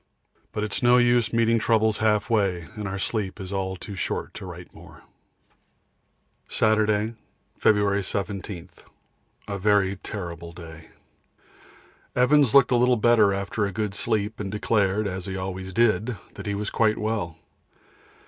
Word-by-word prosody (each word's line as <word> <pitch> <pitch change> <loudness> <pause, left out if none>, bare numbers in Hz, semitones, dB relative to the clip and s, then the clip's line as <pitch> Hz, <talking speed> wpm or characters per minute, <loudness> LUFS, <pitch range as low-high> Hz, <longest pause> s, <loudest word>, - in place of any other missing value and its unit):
But 105 - -3
it's 105 -2 -1
no 120 0 +5
use 120 -2 +3
meeting 115 0 +3
troubles 110 -1 +2
half 105 -1 +2
way, 95 -7 0
and 105 -2 -5
our 95 0 -4
sleep 100 0 -3
is 95 0 -6
all 95 -1 -2
too 100 +2 -8
short 95 - -3
to - - -8
write - - -10
more. - - -15 1.5
Saturday, 110 0 +2 0.5
February 100 -1 +3
17. 95 -2 -4 0.8
A 100 0 -4
very 100 -1 +2
terrible 85 -5 -7
day. 80 -2 -11 1.3
Evans 135 0 +4
looked 135 -2 +6
a 125 - +4
little 125 0 +3
better 110 -2 +4
after 100 +2 -1
a - - -4
good 105 0 -2
sleep, 110 0 -1
and 100 -2 -4
declared, 105 -1 +1
as 95 -1 -4
he 95 0 -4
always 95 0 -5
did, 110 +1 +1 0.2
that - - -8
he 100 - -1
was 105 0 -3
quite 110 -1 +2
well. 105 -7 -2
105 Hz, 150 wpm, -25 LUFS, 95-110 Hz, 1.5 s, looked